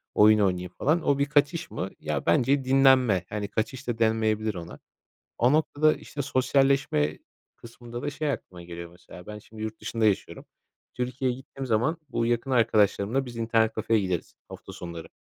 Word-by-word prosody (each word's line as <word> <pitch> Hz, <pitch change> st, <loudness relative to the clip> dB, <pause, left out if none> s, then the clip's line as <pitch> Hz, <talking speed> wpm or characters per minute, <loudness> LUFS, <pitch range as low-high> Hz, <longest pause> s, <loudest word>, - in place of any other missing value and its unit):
oyun 105 Hz, +1 st, +6 dB
oynayayım 90 Hz, -3 st, 0 dB
falan. 160 Hz, +5 st, +2 dB
O 140 Hz, -1 st, +2 dB
bir 140 Hz, -, +3 dB
kaçış 150 Hz, +4 st, +1 dB
mı? 95 Hz, -, -4 dB
Ya, 75 Hz, -2 st, -3 dB
bence 130 Hz, +10 st, +3 dB
dinlenme. 130 Hz, -8 st, +4 dB
Hani, 105 Hz, -1 st, -3 dB
kaçış 120 Hz, +6 st, -3 dB
da 120 Hz, -, -2 dB
denmeyebilir 110 Hz, -1 st, +1 dB
ona. 85 Hz, -1 st, -8 dB, 0.6 s
O 125 Hz, +4 st, +3 dB
noktada, 155 Hz, 0 st, +3 dB
işte, 145 Hz, -, -7 dB
sosyalleşme 135 Hz, -, +1 dB, 0.4 s
kısmında 120 Hz, +1 st, -9 dB
da -, -, -2 dB
şey 145 Hz, +1 st, -2 dB
aklıma 90 Hz, -9 st, -7 dB
geliyor, 85 Hz, 0 st, -8 dB
mesela. 90 Hz, 0 st, -14 dB
Ben 105 Hz, 0 st, -7 dB
şimdi 110 Hz, +1 st, -13 dB
yurt 110 Hz, 0 st, -5 dB
dışında 115 Hz, +1 st, -1 dB
yaşıyorum. 105 Hz, -3 st, -1 dB, 0.5 s
Türkiye'ye 125 Hz, 0 st, -2 dB
gittiğim 135 Hz, 0 st, -8 dB
zaman 125 Hz, +7 st, +1 dB
bu 115 Hz, -, -1 dB
yakın 120 Hz, +3 st, -1 dB
arkadaşlarımla 110 Hz, +1 st, +2 dB
biz 120 Hz, -2 st, -9 dB
internet 115 Hz, -1 st, +1 dB
kafeye 110 Hz, 0 st, +1 dB
gideriz 90 Hz, -4 st, -3 dB, 0.2 s
hafta -, -, -10 dB
sonları. 85 Hz, -2 st, -8 dB
115 Hz, 165 wpm, -26 LUFS, 105-135 Hz, 0.6 s, oyun